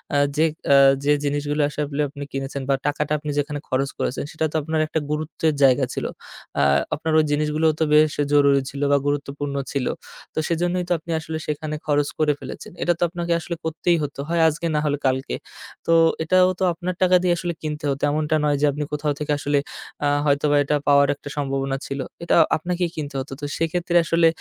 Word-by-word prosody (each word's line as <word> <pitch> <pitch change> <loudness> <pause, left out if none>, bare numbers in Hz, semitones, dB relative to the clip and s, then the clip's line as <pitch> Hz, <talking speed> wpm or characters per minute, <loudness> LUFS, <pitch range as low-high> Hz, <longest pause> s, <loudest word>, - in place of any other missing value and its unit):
আ - - +4 0.2
যে 160 - +4 0.3
আ - - +8 0.3
যে 145 - +3
জিনিসগুলো 145 +1 -1
আসলে 150 0 -3
আপনি 145 0 -8
কিনেছেন 135 +1 -4
বা 135 - +4
টাকাটা 150 0 -1
আপনি 150 0 -4
যেখানে 145 0 -2
খরচ 135 +1 0
করেছেন 130 - -2
সেটা 160 - -1
তো - - -9
আপনার 160 +2 -1
একটা 160 - -1
গুরুত্বের 155 +1 -1
জায়গা 130 0 +5
ছিল। - - -3 0.6
আ - - +4 0.3
আপনার 160 +1 -2
ওই 155 - +3
জিনিসগুলোও 150 +2 +2
তো - - +3
বেশ 155 0 +5 0.2
জরুরি 140 -1 +5
ছিল 140 +1 -7
বা 145 - +5
গুরুত্বপূর্ণ 145 0 -2 0.2
ছিল। 140 -3 -1 0.5
তো - - -18
সেজন্যই 175 +2 0
তো - - +3
আপনি 165 +2 -8
আসলে 160 0 -5
সেখানে 155 0 -3
খরচ 145 -1 +2
করে 150 -1 +3
ফেলেছেন। - - -8
এটা 175 - +3
তো - - +1
আপনাকে 170 0 -2
আসলে 170 +1 -5
করতেই 160 +2 +1
হতো, 145 -1 -5
হয় 170 0 +2
আজকে 160 +2 -1
না - - +3
হলে 145 -1 +1
কালকে। 130 0 -1 0.5
তো 165 - +3 0.3
এটাও 185 +3 +4
তো - - 0
আপনার 180 +2 -4
টাকা 185 0 +5
দিয়ে 180 -1 +3
আসলে 175 0 -3
কিনতে 150 -1 -4
হতো। 135 - -4
এমনটা 155 +1 0
নয় 145 -1 +2
যে - - +4
আপনি 150 +2 -3
কোথাও 150 0 0
থেকে 150 0 -2
আসলে 145 0 +1 0.5
আ - - +3 0.2
হয়তোবা 145 0 +2
এটা 145 +1 0
পাওয়ার 140 0 +5
একটা 145 - -10
সম্ভাবনা 135 -1 -1
ছিল। 140 - -4 0.2
এটা 170 - +2 0.2
আপনাকেই 175 +2 -2
কিনতে 145 -3 -5
হতো। 135 - -9
তো - - -3
সেক্ষেত্রে 170 +1 -1
আসলে 165 0 +4
150 Hz, 200 wpm, -22 LUFS, 145-160 Hz, 0.6 s, আ